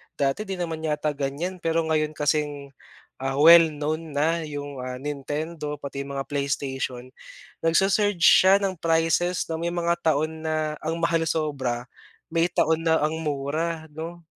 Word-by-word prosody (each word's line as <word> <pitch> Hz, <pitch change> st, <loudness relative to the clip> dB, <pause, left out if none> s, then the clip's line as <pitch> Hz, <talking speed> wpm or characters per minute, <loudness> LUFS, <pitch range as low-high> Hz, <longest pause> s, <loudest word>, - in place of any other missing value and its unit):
Dati 140 Hz, +10 st, -1 dB
'di 195 Hz, -, -3 dB
naman 165 Hz, -3 st, -4 dB
yata 150 Hz, 0 st, 0 dB
ganiyan, 145 Hz, +6 st, -4 dB
pero 165 Hz, 0 st, 0 dB
ngayon 155 Hz, -1 st, 0 dB
kasing, 145 Hz, -2 st, -1 dB, 0.5 s
ah, 135 Hz, 0 st, -2 dB
well 165 Hz, +3 st, +8 dB
known 155 Hz, 0 st, -4 dB
na 165 Hz, +3 st, +2 dB
'yong, 145 Hz, -2 st, -6 dB
ah, 125 Hz, 0 st, -5 dB
Nintendo 150 Hz, +3 st, -4 dB
pati 140 Hz, -1 st, -6 dB
'yong 140 Hz, -, -6 dB
mga 135 Hz, -, -2 dB
PlayStation, 135 Hz, -3 st, -3 dB, 0.5 s
nagsu-surge 195 Hz, +2 st, +2 dB
siya 190 Hz, +1 st, +7 dB
ng 185 Hz, -4 st, -2 dB
prices, 165 Hz, +2 st, +1 dB
'no. 160 Hz, -, -2 dB
May 170 Hz, +1 st, -2 dB
mga 170 Hz, 0 st, 0 dB
taon 155 Hz, +1 st, 0 dB
na 155 Hz, -1 st, -1 dB
ang 160 Hz, +1 st, -2 dB
mahal 165 Hz, -1 st, +2 dB
sobra, 135 Hz, -7 st, -1 dB, 0.5 s
may 165 Hz, 0 st, +2 dB
taon 165 Hz, -1 st, +1 dB
na 160 Hz, -, +5 dB
ang 155 Hz, +1 st, -1 dB
mura, 155 Hz, +2 st, -3 dB
'no. 165 Hz, +2 st, -7 dB
155 Hz, 155 wpm, -25 LUFS, 145-165 Hz, 0.5 s, well